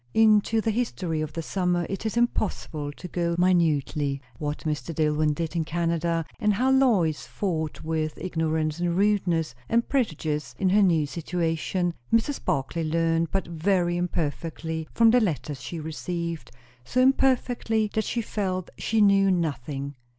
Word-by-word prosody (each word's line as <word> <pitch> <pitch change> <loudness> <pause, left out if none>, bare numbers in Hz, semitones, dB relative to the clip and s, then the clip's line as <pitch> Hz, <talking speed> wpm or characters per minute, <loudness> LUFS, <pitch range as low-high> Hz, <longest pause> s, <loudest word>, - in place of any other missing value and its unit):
Into 220 0 +4
the 225 - 0
history 190 -8 -2
of 155 - -4
the 165 - -4
summer 180 -1 0
it 195 +3 -3
is 220 - -3
impossible 175 -10 -1
to 180 - -9
go 170 -1 -1
minutely. 155 -5 +2 0.2
What 150 0 -3
Mr. 150 0 -3
Dillwyn 150 -1 +2
did 165 +1 -3
in 165 - +1
Canada, 165 0 -1
and 210 -1 +2
how 255 +5 +2
Lois 215 - +3
fought 160 -6 -3
with 155 -1 -2
ignorance 160 -2 -1
and 175 0 0
rudeness 180 - +1 0.2
and 235 +1 +2
prejudice 155 - -1
in 190 - +1
her 205 +3 +4
new 165 -6 +3
situation, 170 +2 -1 0.2
Mrs. 230 +5 +1
Barclay 140 +5 -1
learned 165 +1 +1
but 195 - -1
very 175 +1 +1
imperfectly 160 -1 -3
from 230 -1 +5
the 245 +1 +5
letters 150 - -2
she 170 - -5
received; 165 -2 -4 0.3
so 250 - -1
imperfectly, 250 -4 +2
that 220 - +1
she 235 - -1
felt 185 -4 -3
she 225 0 +1
knew 195 -1 +5
nothing. 145 -5 -2
170 Hz, 150 wpm, -26 LUFS, 155-200 Hz, 0.3 s, from